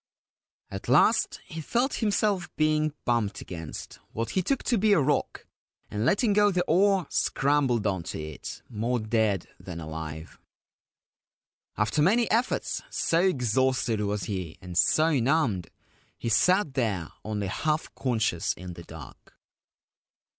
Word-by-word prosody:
At 95 0 -6
last 155 - +4
he 165 -3 -7
felt 245 - 0
himself 205 -4 +1
being 155 -1 +1
bumped 115 -4 0
against 80 -4 -8
what 115 0 -3
he 190 - +1
took 270 +8 -1
to 235 -4 +1
be 210 +1 +4
a 195 - +5
rock, 145 +1 0 0.5
and 105 +4 -1
letting 210 - +3
go 205 0 +5
the 180 -2 +1
oar 190 +2 +3
scrambled 135 -6 +1
on 95 -3 0
to - - -5
it 75 -1 -7
more 120 +2 -1
dead 110 -4 0
than 90 -3 -7
alive. 80 0 -7 1.4
After 110 +7 +1
many 220 +8 +4
efforts, 235 +3 0
so 165 - +1
exhausted 130 - +1
was 105 -1 -1
he 90 -6 -4
and 90 -2 -9
so 155 - +3
numbed, 120 - +1 0.5
he 115 - -3
sat 180 - +3
there 105 - -1
only 105 -1 -3
half 155 +11 -1
conscious 110 -9 0
in 90 0 -8
the 85 - -10
dark. 80 -2 -13
125 Hz, 140 wpm, -27 LUFS, -, 1.4 s, a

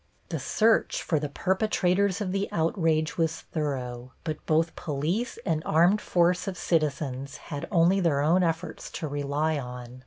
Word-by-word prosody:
The - - -2
search 225 0 +2
for 155 - +1
the 150 0 -3
perpetrators 190 +3 +1
of 190 -3 -1
the 195 +1 -1
outrage 160 -1 +1
was 165 0 0
thorough, 130 -5 -4
but 155 -2 -4
both 160 +1 +2
police 165 - -2
and 160 -4 0
armed 175 +7 +4
force 180 +2 +2
of 190 -2 -3
citizens 140 -4 -1 0.2
had 145 - -4
only 180 +1 +4
their 165 -6 +2
own 165 +5 +4
efforts 170 0 -2
to 155 - -3
rely 145 +2 -1
on. 125 -1 -8
160 Hz, 155 wpm, -27 LUFS, 145-180 Hz, 0.2 s, armed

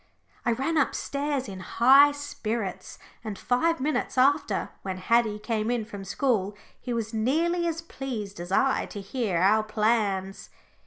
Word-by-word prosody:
I 235 - +4
ran 275 +7 -1
upstairs 280 -1 -1
in 190 -2 -7
high 265 +9 +6
spirits, 230 -8 -4 0.3
and 215 -3 -5
five 330 - +1
minutes 290 0 -1
after 270 -5 +2
when 190 -1 -4
Haddie 220 +2 +2
came 215 0 -2
in 240 -3 -1
from 205 -3 -8
school 205 -2 0 0.2
he 250 - -6
was 230 -1 -2
nearly 330 +10 +1
as 330 0 -3
pleased 235 - -6
as 175 +1 -7
I 265 +7 +2
to 205 - -7
hear 200 -2 -2
our 200 +5 +4
plans. 210 -3 -1
230 Hz, 150 wpm, -26 LUFS, 205-275 Hz, 0.3 s, high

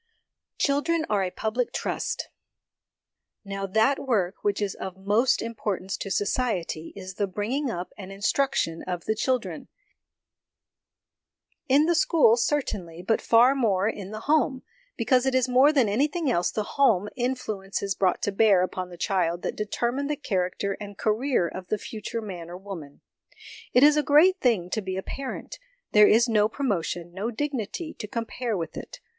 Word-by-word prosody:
Children 315 +3 +1
are 200 -2 +2
a 185 - -1
Public 220 +6 -2
Trust. - - -3 1.2
Now, 195 0 -4
that 220 +8 +2
work 200 -8 -1
which 205 -1 +1
is 205 -2 -1
of 190 -1 -7
most 210 +7 +2
importance 205 -4 -3
to 195 - -5
society 195 -6 -1
is 190 -1 -8
the 200 +1 -1
bring 205 +4 -4
ing 280 0 0
up 180 -5 -5
and 195 -1 -8
instruction 195 -4 0
of 180 -2 -4
the 220 - +1
children 250 +3 -2 2.0
in 285 +4 +5
the 345 - +3
school, 320 -8 +4
certainly, 205 - -2
but 220 +4 +1
far 240 +3 +5
more 210 -7 +1
in 200 -3 -4
the 215 +1 -7
home, 290 -2 +1 0.3
because 250 +2 +2
it 265 - +1
is 260 -1 +3
more 260 +4 +5
than 270 -7 +3
anything 290 - +1
else 175 -6 +1
the 215 - -2
home 210 -6 +2
influences 215 -6 -2
brought 185 -2 0
to 205 - +1
bear 200 -2 +4
upon 185 0 -4
the 175 - -11
child 175 -2 0
that - - -2
determine 240 +6 -2
the 300 - -1
character 195 -5 -2
and 205 -1 -8
career 220 -3 +1
of 185 +1 -8
the 215 - 0
future 220 +2 -6
man 175 -5 -7
or 175 - -7
woman. 180 -7 -9 0.7
It 250 - +5
is 300 +1 +7
a - - +4
great 325 +7 +5
thing 205 - +1
to 220 - -1
be 190 -1 -4
a 190 - -3
parent: 270 - -6 0.3
there 210 0 +7
is 235 +3 +5
no 215 -2 +3
promotion, 175 -9 -2
no 200 +5 -3
dignity, 280 - -3
to 210 - -5
compare 230 0 -3
with 165 -2 -5
it. - - -8
215 Hz, 170 wpm, -26 LUFS, 190-255 Hz, 2.0 s, is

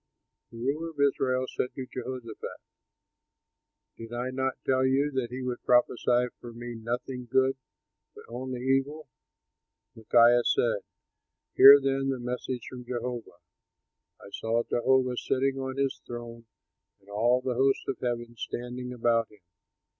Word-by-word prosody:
'" - - -56
The 115 - -11
ruler 145 +7 -2
of 155 -3 -14
Israel 130 -2 +2
said 125 - -3
to 130 - -5
Jehoshaphat, 125 -3 -7 1.4
"Did 115 0 -9
I 120 +2 -3
not 130 0 -2
tell 130 0 +2
you 135 +3 +2
that 130 -3 -2
he 130 +2 -5
would 125 -1 -4
prophesy 125 0 +3
for 120 - -9
me 120 +1 -7
nothing 120 +2 -5
good, 130 +1 +3 0.6
but - - -12
only 125 +1 -5
evil?" 135 +3 0 0.8
Micaiah 120 +2 +5
said, 115 -3 +2 0.7
"Hear 140 +1 +10
then 135 0 0
the 135 - -1
message 125 0 -4
from 125 -1 -8
Jehovah: 120 -6 -5 0.8
I 100 - -13
saw 115 +3 -1
Jehovah 125 +1 +1
sitting 135 +2 0
on 130 0 -4
his 140 -1 -1
throne 120 -1 -8 0.5
and 100 - -28
all 115 +5 +2
the 130 -1 -1
host 135 +2 +1
of 135 - -3
heaven 120 -1 -3
standing 125 +2 -5
about 115 -2 +1
him. 105 -2 -21
125 Hz, 145 wpm, -28 LUFS, 120-130 Hz, 1.4 s, Hear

